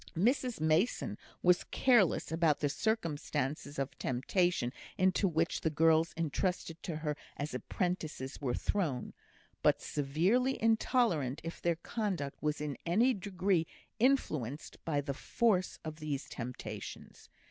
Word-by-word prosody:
Mrs 245 - +2
Mason 160 - +2 0.3
was 180 0 +5
careless 235 -13 +3
about 160 -2 +3
the 145 - +1
circumstances 150 - -1
of 135 0 -2
temptation 130 +1 +1 0.2
into 185 +2 +3
which 165 -1 0
the 160 - +1
girls 160 +1 +4
entrusted 165 +1 -1
to 170 - -4
her 155 -1 -2 0.2
as 145 -1 -3
apprentices 150 - -3
were 125 -3 0
thrown, 155 - -1 0.5
but - - +4
severely 180 - +1
intolerant 220 - +2
if 165 +1 -6
their 170 -1 +2
conduct 175 -5 -3
was 150 -1 0
in 150 -2 -4
any 225 +10 +3
degree 185 -4 0 0.3
influenced 155 - 0
by 145 -3 +1
the 140 0 -3
force 185 - +1
of 155 -1 -5
these 150 -3 -3
temptations. 125 0 -7
165 Hz, 125 wpm, -33 LUFS, 145-195 Hz, 0.5 s, was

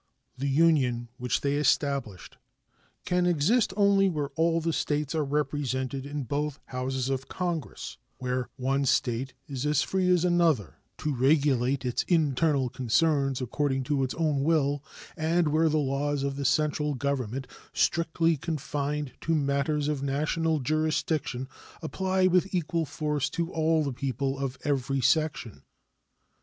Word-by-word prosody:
The 140 +2 -2
Union 135 -6 +2
which 125 -1 -1
they 140 0 0
established 140 - 0 0.7
can 180 0 +1
exist 180 +9 +2
only 200 -1 +4
where 150 -5 -2
all 165 +1 +1
the 165 0 -1
States 150 -1 -1
are 155 -2 +1
represented 135 -2 -2
in 145 0 -4
both 145 +3 -2
Houses 130 0 -3
of 135 0 -2
Congress; 175 -6 -4 0.2
where 125 -1 -2
one 135 +2 0
State 125 0 0
is 135 -3 -4
as 150 -1 +2
free 185 -1 0
as 180 -1 +3
another 170 - +2 0.2
to 150 - -2
regulate 135 -1 +2
its 125 - 0
internal 150 -4 +2
concerns 135 +2 +1
according 135 +1 -1
to 140 0 0
its 130 - -2
own 155 -4 +1
will, 145 -2 +1 0.3
and 160 +1 +1
where 160 +2 +3
the 155 - +1
laws 140 0 0
of 140 0 -2
the 140 0 -4
central 150 0 +1
Government, 135 -2 -2 0.3
strictly 165 -1 +1
confined 145 -2 -3
to 165 - +1
matters 145 0 0
of 150 -2 -1
national 150 +3 0
jurisdiction, 155 -2 -1 0.4
apply 185 +3 0
with 185 +1 +2
equal 165 -2 -1
force 150 -4 -1
to 170 +3 -3
all 160 0 +2
the 140 -3 -2
people 135 +1 -2
of 135 -2 -3
every 135 -1 0
section. 135 - 0
145 Hz, 145 wpm, -28 LUFS, 135-160 Hz, 0.7 s, only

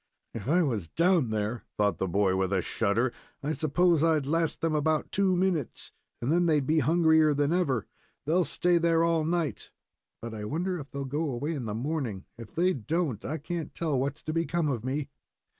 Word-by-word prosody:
"If 115 0 -6
I 175 +5 +4
was 110 - -1
down 170 - +2
there," 110 +2 -2
thought 105 -5 +1
the 95 - 0
boy, 95 +1 +2
with 95 0 0
a 95 -3 +1
shudder, 115 +3 0 0.3
"I 150 +2 -1
suppose 160 +2 +2
I'd 160 -4 +2
last 165 +2 0
them 165 -1 +1
about 155 +1 0
two 195 -2 +2
minutes, 175 -7 -1 0.3
and 120 +5 -1
then 175 +1 +3
they'd 150 -4 +2
be 155 +3 +3
hungrier 160 0 +4
than 145 +3 +1
ever. 140 - +1 0.4
They'll 170 +5 +3
stay 175 +3 +2
there 165 0 +3
all 165 -1 +2
night, 165 -1 -2 0.5
but 115 -1 -7
I 105 -1 -6
wonder 175 - -2
if 140 -1 -9
they'll 140 0 -5
go 150 +4 -2
away 140 +6 -2
in 135 -6 -4
the 105 -1 -3
morning. 125 - -3
If 115 -2 -12
they 180 +3 +3
don't, 145 - -2
I 155 +4 -3
can't 165 +2 -5
tell 155 -6 0
what's 140 +2 -3
to 155 - -3
become 165 -1 0
of 120 -5 -2
me." 140 +3 -2
150 Hz, 200 wpm, -28 LUFS, 120-165 Hz, 0.5 s, I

